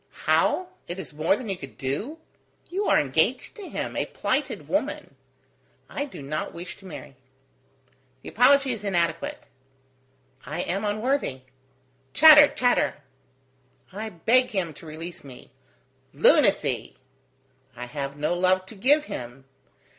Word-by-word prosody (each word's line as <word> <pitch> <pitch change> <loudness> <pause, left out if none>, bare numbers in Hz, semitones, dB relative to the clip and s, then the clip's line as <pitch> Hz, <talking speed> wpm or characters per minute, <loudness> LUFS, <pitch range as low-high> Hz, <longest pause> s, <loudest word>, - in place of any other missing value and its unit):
"How, 365 0 +2 0.2
it 175 - -5
is 190 -5 -8
more 155 +5 +2
than 240 +1 -7
you 195 - -2
can 135 -7 -11
do? 150 - -4 0.5
You 395 +3 -1
are - - +4
engaged - - 0
to 405 -3 -8
him, - - -4
a - - -1
plighted - - -2
woman." - - -2 0.8
"I 285 - -2
do 265 - -10
not 145 +3 -4
wish 175 +2 -7
to 195 - -14
marry." 145 -5 -10 1.1
"The - - -7
apology 270 +3 +4
is 225 -4 -5
inadequate." 200 - -1 1.0
"I 155 +6 -4
am 195 +4 -2
unworthy.. 215 - -1 0.4
." 130 0 -40
"Chatter! 305 -1 +9
chatter!" 245 - 0 0.9
"I 215 +3 -5
beg 230 +8 +2
him 185 -7 -2
to 160 - -13
release 165 +3 -8
me." 130 -2 -13 0.6
"Lunacy!" 195 - +3 0.8
"I 125 +1 -6
have 140 +2 -5
no 150 +3 0
love 185 +1 +2
to 205 - -12
give 285 +9 +3
him." 125 - -8
185 Hz, 140 wpm, -25 LUFS, -, 1.1 s, Chatter